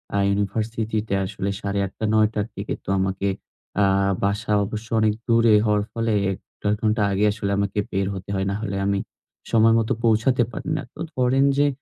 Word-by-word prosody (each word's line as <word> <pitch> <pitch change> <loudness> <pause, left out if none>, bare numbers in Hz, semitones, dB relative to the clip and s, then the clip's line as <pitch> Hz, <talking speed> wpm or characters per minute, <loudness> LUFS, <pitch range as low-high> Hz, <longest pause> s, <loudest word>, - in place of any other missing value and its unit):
আ - - +2
ইউনিভার্সিটিতে 110 +1 -1
আসলে 95 0 -3
৮ঃ৩০ 100 -1 -2
টা 110 - 0
৯ 110 -1 +5
টার 105 -1 -1
থেকে - - -4
তো - - -8
আমাকে 95 +1 -1 0.6
আ - - +5 0.4
বাসা 105 +2 0
অবশ্য 110 +2 -6
অনেক 110 -1 +3
দূরে 115 -1 +5
হওয়ার 105 -1 +2
ফলে 115 -1 -1 0.2
১-১.৫ 105 +2 -3
ঘণ্টা 110 0 +1
আগে 100 +2 +2
আসলে 100 -1 -3
আমাকে 100 +1 -1
বের 95 0 0
হতে 95 0 -8
হয়। 95 0 0
নাহলে 100 -1 -3
আমি 100 0 +1 0.5
সময় 115 0 +5
মতো 110 - 0
পৌঁছাতে 115 +2 +3
পারি 130 - -6
না। - - -2
তো 155 - -17 0.2
ধরেন 130 +2 +3
যে, 145 0 +4
105 Hz, 180 wpm, -23 LUFS, 100-115 Hz, 0.6 s, ৯